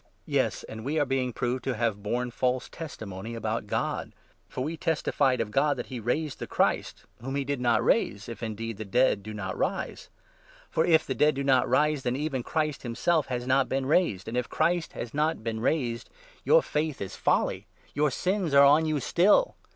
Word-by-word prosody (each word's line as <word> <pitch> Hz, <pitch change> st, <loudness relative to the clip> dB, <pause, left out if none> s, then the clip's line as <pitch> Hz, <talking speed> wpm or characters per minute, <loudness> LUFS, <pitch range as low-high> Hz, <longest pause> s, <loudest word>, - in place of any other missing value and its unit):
Yes, -, -, 0 dB
and 110 Hz, 0 st, -8 dB
we 145 Hz, +5 st, -1 dB
are 145 Hz, -, +3 dB
being 130 Hz, -1 st, 0 dB
proved 125 Hz, +1 st, -2 dB
to 130 Hz, -, -1 dB
have 110 Hz, -2 st, -1 dB
borne 120 Hz, +4 st, -2 dB
false 125 Hz, +1 st, 0 dB
15 -, -, -17 dB
testimony 110 Hz, -, -7 dB
about 110 Hz, 0 st, -3 dB
God; -, -, -2 dB, 0.4 s
for 130 Hz, -, -4 dB
we 160 Hz, +4 st, -3 dB
testified 150 Hz, -5 st, +1 dB
of 110 Hz, -2 st, -2 dB
God 145 Hz, +5 st, +2 dB
that 120 Hz, -, -4 dB
he 125 Hz, -, -3 dB
raised 135 Hz, +6 st, -2 dB
the -, -, -5 dB
Christ, -, -, 0 dB, 0.2 s
whom 135 Hz, +3 st, -4 dB
he 140 Hz, -, 0 dB
did 140 Hz, -2 st, -2 dB
not 120 Hz, -2 st, +2 dB
raise, 100 Hz, +1 st, +1 dB
if, 115 Hz, -2 st, -8 dB
indeed, 115 Hz, -1 st, -4 dB
the 110 Hz, -, -5 dB
dead 115 Hz, +1 st, +2 dB
do 110 Hz, +2 st, -8 dB
not 100 Hz, -3 st, -4 dB
rise! -, -, -3 dB, 0.6 s
For, 160 Hz, -, +2 dB
if 160 Hz, -2 st, +4 dB
the 130 Hz, -, -2 dB
dead 150 Hz, +4 st, +3 dB
do 140 Hz, -, -2 dB
not 130 Hz, -2 st, +3 dB
rise, 150 Hz, +2 st, +2 dB
then 125 Hz, -1 st, -1 dB
even 140 Hz, -2 st, -2 dB
Christ 155 Hz, +2 st, -2 dB
himself 140 Hz, +7 st, 0 dB
has 125 Hz, -1 st, -3 dB
16 -, -, -9 dB
not 135 Hz, +1 st, +3 dB
been 135 Hz, 0 st, -1 dB
raised, 135 Hz, -, +1 dB
and, 115 Hz, -, -4 dB
if 125 Hz, 0 st, -1 dB
Christ 175 Hz, -1 st, 0 dB
has 120 Hz, -, -6 dB
not 150 Hz, -3 st, 0 dB
been 115 Hz, -1 st, -3 dB
raised, 120 Hz, -2 st, -1 dB, 0.3 s
your -, -, +5 dB
faith 150 Hz, -1 st, -2 dB
is 95 Hz, -, -5 dB
17 -, -, -13 dB
folly -, -, +1 dB
— -, -, -30 dB
your 150 Hz, +1 st, +2 dB
sins 180 Hz, +2 st, -1 dB
are 140 Hz, 0 st, +8 dB
on 150 Hz, +3 st, +5 dB
you 155 Hz, -2 st, 0 dB
still 200 Hz, -, +3 dB
130 Hz, 215 wpm, -27 LUFS, 115-150 Hz, 0.6 s, are